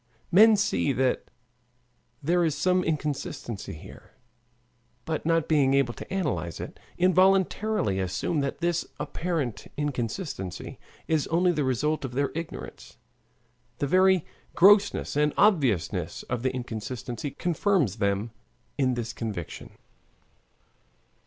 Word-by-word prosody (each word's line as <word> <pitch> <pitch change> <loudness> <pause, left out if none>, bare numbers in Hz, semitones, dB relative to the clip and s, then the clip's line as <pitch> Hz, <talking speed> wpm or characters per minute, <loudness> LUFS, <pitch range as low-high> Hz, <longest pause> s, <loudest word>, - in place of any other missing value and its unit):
Men 215 +4 +7
see 195 -8 +1
that 130 +1 0 1.0
there 175 +4 +2
is 160 -3 0
some 185 0 +2
inconsistency 145 - -3
here, 75 - -13 0.9
but 160 -1 -3
not 165 -1 +2
being 140 -4 +3
able 135 -3 +2
to - - -10
analyze 145 - -2
it, - - -8 0.2
involuntarily 185 - +3
assume 95 - -1
that 140 +4 -3
this 175 0 +1 0.2
apparent 160 -9 -3
inconsistency 125 - -4 0.3
is 160 -3 +1
only 175 +2 +3
the 150 -4 0
result 145 +5 0
of 130 -2 -5
their 140 +1 0
ignorance. 165 0 -7 0.8
The - - -1
very 185 +2 +4 0.3
grossness 205 -1 +5
and 150 0 +2
obviousness 140 - +2
of 125 -1 -3
the 130 +1 0
inconsistency 125 +2 -5
confirms 170 - 0
them 100 +2 0 0.5
in 130 -2 +2
this 115 -1 -4
conviction. 105 -10 -6
145 Hz, 115 wpm, -27 LUFS, 120-175 Hz, 1.0 s, Men